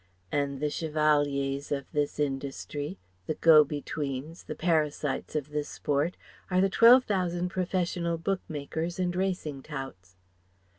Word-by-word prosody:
And 140 -1 -1
the 150 0 -1
chevaliers 145 -3 +1
of 140 -2 -3
this 150 -1 -1
"industry," 140 -3 -3 0.3
the - - -1
go 155 -2 +7
betweens, 145 +1 -5
the - - -5
parasites 155 -4 0
of 150 -1 -2
this 150 0 -2
sport, 145 +4 -1 0.3
are 185 -1 +2
the 195 +1 +4
twelve 240 +5 +8
thousand 180 -4 -1
professional 175 -2 -1
book 190 +3 -1
makers 160 +3 -3
and 180 -1 -1
racing 180 -7 -2
touts. 135 - -8
150 Hz, 135 wpm, -29 LUFS, 140-175 Hz, 0.3 s, twelve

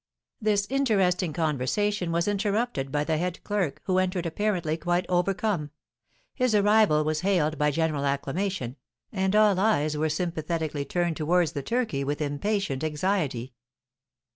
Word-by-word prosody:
This 210 -2 +2
interesting 195 - +2
conversation 165 +6 0
was 170 +2 0
interrupted 205 - -1
by 145 0 +1
the 155 0 0
head 180 0 -3
clerk, 195 -9 -1
who 185 -1 +1
entered 185 -1 -1
apparently 170 -2 -1
quite 175 +2 0
overcome. 180 -2 0 0.6
His 255 -4 +1
arrival 205 -6 +4
was 155 0 0
hailed 160 -5 +1
by 150 0 +3
general 155 -1 0
acclamation, 140 0 -2 0.3
and 190 0 0
all 210 -3 +5
eyes 155 -8 +2
were 155 +1 0
sympathetically 155 -2 -2
turned 175 +2 -1
towards 165 +1 +2
the 145 - -4
turkey 225 - -1
with 145 +1 -2
impatient 150 0 -1
anxiety. 150 -6 -1
175 Hz, 140 wpm, -26 LUFS, 150-200 Hz, 0.6 s, all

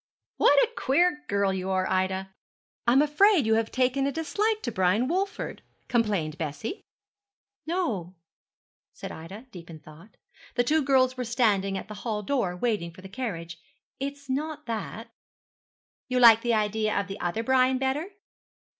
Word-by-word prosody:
'What 285 - +5
a - - -1
queer 300 +2 +2
girl 200 -1 +1
you 190 0 -3
are, 185 -1 +1
Ida! 190 +1 -1 0.5
I'm 260 +4 +5
afraid 310 - +4
you 220 - +3
have 225 0 +1
taken 260 +2 +1
a - - 0
dislike 415 +9 -1
to 240 - -2
Brian 200 +5 +2
Walford,' 385 +5 -2 0.3
complained 205 -10 0
Bessie. 155 - -4 0.9
'No,' 225 - -2 0.8
said - - -8
Ida, 190 +9 -9
deep 175 -4 -11
in 165 - -9
thought, 155 +7 -16 0.4
the 245 - +3
two 310 +6 +2
girls 260 -1 +3
were 250 - -2
standing 210 -5 +1
at - - -7
the 215 - -8
hall 215 -3 -3
door, 200 -7 -1
waiting 205 -4 -1
for 185 - -14
the 190 - -9
carriage, 170 -8 -5 0.4
'it 275 +1 -2
is 285 -1 -20
not 300 +3 -3
that.' 230 0 -5 1.0
'You 255 -1 0
like 230 -2 +8
the 235 -1 +1
idea 215 0 0
of 200 - -2
the 200 +1 -7
other 175 +6 -2
Brian 260 +1 +3
better?' 270 +5 -1
230 Hz, 165 wpm, -27 LUFS, 190-270 Hz, 1.0 s, like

